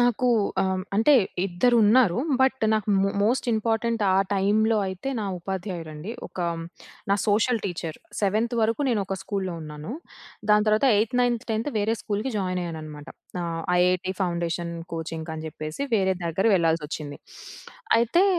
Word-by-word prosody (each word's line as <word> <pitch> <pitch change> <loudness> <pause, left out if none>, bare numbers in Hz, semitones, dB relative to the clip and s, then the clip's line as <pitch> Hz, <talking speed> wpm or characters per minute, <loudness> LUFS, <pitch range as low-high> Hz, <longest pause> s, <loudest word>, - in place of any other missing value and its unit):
నాకు 245 +1 +2 0.4
ఆహ్, 190 - +1
హ్మ్. 185 0 -2
అంటే 225 +7 +5 0.3
ఇద్దరున్నారు. 220 +2 +4 0.2
బట్ 265 0 +3
నాకు 215 -1 0
మో 195 - +2
మోస్ట్ 240 +4 +1
ఇంపార్టెంట్ 225 0 0
ఆ - - +4 0.2
టైమ్‌లో 215 +3 +2
అయితే 190 +7 -5
నా - - -2
ఉపాధ్యాయురండి. 175 -2 -5 0.2
ఒక - - -15 0.7
నా - - +5
సోషల్ 220 +2 +2
టీచర్ 170 -4 -4 0.2
సెవెన్త్ 215 +4 +1
వరకు 225 +5 +1
నేను 225 -4 +1
ఒక 195 - -3
స్కూల్లో 190 -4 -3
ఉన్నాను. 150 +7 -7 0.6
దాని 210 +1 +5
తర్వాత 215 +5 +3
ఎయిథ్, 225 +4 0
నైన్త్, 240 -2 +1
10థ్ 225 +6 -1
వేరే 220 +2 +1
స్కూల్‌కి 215 +5 -2
జాయినయ్యాననమాట. 165 -6 -4 0.3
ఆహ్, 165 -1 -3 0.2
ఐఐటీ 180 +1 +2
ఫౌండేషన్ 170 -1 -1 0.2
కోచింగ్‌కి 160 0 -5
అని 155 - -6
చెప్పేసి, 155 - -6
వేరే 190 -2 +2
దగ్గర 170 +4 0
వెళ్ళాల్సొచ్చింది. 160 -4 -1 0.8
అయితే 240 - +3
195 Hz, 140 wpm, -25 LUFS, 170-225 Hz, 0.8 s, అంటే